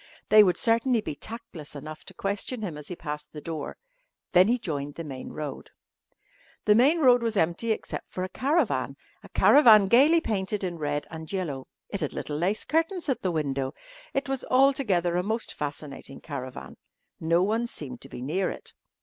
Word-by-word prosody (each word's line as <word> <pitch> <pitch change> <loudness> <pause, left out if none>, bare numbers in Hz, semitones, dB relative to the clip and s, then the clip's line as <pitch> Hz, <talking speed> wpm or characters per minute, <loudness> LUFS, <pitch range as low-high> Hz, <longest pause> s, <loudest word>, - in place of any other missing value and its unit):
They 215 0 +9
would 180 -3 +2
certainly 230 +1 +2
be 210 - -4
tactless 170 -5 -8
enough 155 +2 -8
to - - -11
question 205 +4 -3
him 175 -7 -4
as 150 -1 -9
he 180 - -5
passed 150 -2 -6
the 150 - -6
door. 155 -1 -5 0.5
Then 185 +1 +6
he 240 +2 +3
joined 145 - -4
the 165 - -5
main 135 -4 -7
road. 150 -3 -6 1.0
The 210 - +6
main 280 +9 +4
road 250 -3 +6
was 225 -2 -1
empty 175 +7 +1
except 220 - -4
for 185 - -3
a 185 - -3
caravan 290 - 0 0.2
a - - -14
caravan 220 -8 +7
gaily 275 +11 +6
painted 205 -6 -2
in 175 -3 -3
red 145 -1 -2
and 160 -1 -8
yellow. 155 -9 -3 0.2
It 200 - -4
had 150 - -2
little 150 - -4
lace 190 +7 0
curtains 330 +1 0
at 265 - 0
the 185 - 0
window. 140 -4 -2 0.4
It 275 +1 -1
was 270 -1 -2
altogether 255 - +3
a - - +2
most 220 +3 -2
fascinating 145 -2 -6
caravan. 130 -4 -7 0.4
No 170 +2 +2
one 225 +4 0
seemed 130 - -7
to - - -11
be 125 - -7
near 180 +8 0
it. - - -8
185 Hz, 185 wpm, -27 LUFS, 150-230 Hz, 1.0 s, They